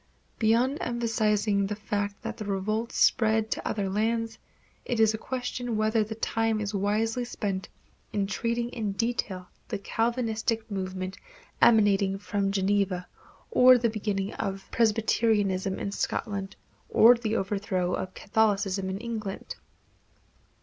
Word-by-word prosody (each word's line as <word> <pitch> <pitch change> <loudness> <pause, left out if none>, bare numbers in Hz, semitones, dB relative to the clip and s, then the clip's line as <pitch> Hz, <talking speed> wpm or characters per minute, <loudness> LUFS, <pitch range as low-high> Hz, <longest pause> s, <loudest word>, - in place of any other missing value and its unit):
Beyond 240 +6 +2
emphasizing 215 -4 +1
the 210 - -3
fact 205 -1 -3
that - - -5
the 215 - -5
revolt 215 +4 -1
spread 220 -2 +3
to - - -2
other 205 -2 -1
lands, 225 +3 -1 0.4
it 240 - -2
is 220 -1 +5
a - - -2
question 245 -2 -3
whether 215 +1 +2
the 220 +1 -6
time 225 0 0
is 210 0 -3
wisely 215 +4 0
spent 200 -5 -3 0.4
in 200 -2 0
treating 235 +4 -1
in 220 -5 -3
detail 195 -5 -2 0.2
the - - -3
Calvinistic 225 0 -1
movement 185 -1 -4 0.4
emanating 200 -3 +4
from 195 0 -1
Geneva, 195 -2 0 0.4
or 255 - +7
the 235 -2 +1
beginnings 205 -2 -2
of 195 0 -3
Presbyterianism 210 -4 +2
in 200 - -3
Scotland, 200 -1 -3 0.3
or 235 +2 +7
the 225 -2 -2
overthrow 190 -3 -1
of 185 - -4
Catholicism 200 -3 +1
in 190 - -3
England. 220 - -5
215 Hz, 130 wpm, -27 LUFS, 195-225 Hz, 0.4 s, or